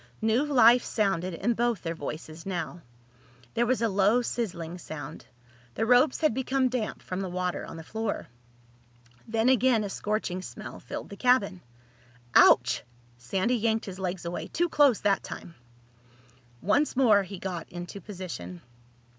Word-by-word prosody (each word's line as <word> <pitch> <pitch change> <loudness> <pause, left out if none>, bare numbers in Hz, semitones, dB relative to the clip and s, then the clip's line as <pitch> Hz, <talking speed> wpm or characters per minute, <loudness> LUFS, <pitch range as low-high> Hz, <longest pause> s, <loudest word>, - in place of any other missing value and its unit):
New 225 +5 +3
life 245 -4 +6
sounded 185 -5 0
in 230 +8 0
both 235 -3 0
their 165 -1 -2
voices 155 +1 -7
now. 175 -2 -4 0.7
There 235 +1 +1
was 250 -1 +1
a - - +4
low 205 +4 +3
sizzling 180 -8 -4
sound. 150 -4 -8 0.5
The 225 - 0
ropes 250 +5 +4
had 310 -6 +3
become 260 +1 +1
damp 245 -4 -3
from 185 +1 -4
the 190 - -3
water 180 0 -2
on - - -8
the 160 - -8
floor. 220 +4 -3 1.0
Then 225 +1 +1
again 255 -3 +4
a 200 - -4
scorching 205 -4 -2
smell - - -8
filled - - -7
the 200 - -9
cabin. 205 -7 +2 0.7
"Ouch!" 125 0 +6 0.4
Sandy 195 - 0
yanked 225 0 0
his 190 -1 -7
legs 185 -1 -3
away. 170 +1 -4
"Too 345 +1 0
close 285 -8 +4
that 200 -1 +2
time." 170 - -8 1.1
Once 265 +11 +2
more 225 -6 +5
he 195 0 -7
got 180 -2 -5
into 175 +3 -7
position. 170 - -7
205 Hz, 155 wpm, -28 LUFS, 180-240 Hz, 1.1 s, life